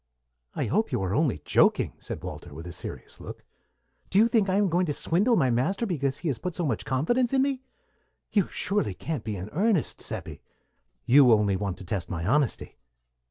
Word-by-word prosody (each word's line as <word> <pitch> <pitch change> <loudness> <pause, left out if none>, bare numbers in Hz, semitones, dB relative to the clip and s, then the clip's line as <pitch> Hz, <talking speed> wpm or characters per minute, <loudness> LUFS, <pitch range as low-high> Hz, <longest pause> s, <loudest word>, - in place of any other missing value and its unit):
"I - - -1
hope 215 +6 0
you 125 - 0
are 95 0 -1
only 145 -3 0
joking," - - +3
said - - -7
Walter, 70 - -8
with 80 +2 -8
a 90 - -7
serious - - -8
look. - - -9 0.7
"Do 190 - 0
you 220 +3 +6
think 220 -4 +2
I 185 - +2
am 205 0 +3
going 175 +1 +1
to 150 - 0
swindle 200 - +2
my 130 - +2
master 165 - 0
because 140 - -1
he 170 - -5
has 125 -6 -2
put 180 -3 -4
so 175 - -1
much 125 -7 -2
confidence 235 - +1
in 265 0 +4
me? 270 -2 -1 0.7
You 200 -4 +3
can't - - -18
surely 190 - -1 0.3
be 110 -2 -3
in 95 +2 -6
earnest, 195 -1 0
Seppi. - - -7 0.6
You 130 -1 +6
only 105 -3 +3
want 95 -1 -3
to 95 - -10
test 95 -1 -3
my 80 -3 -3
honesty." 135 - 0
150 Hz, 205 wpm, -27 LUFS, -, 0.7 s, you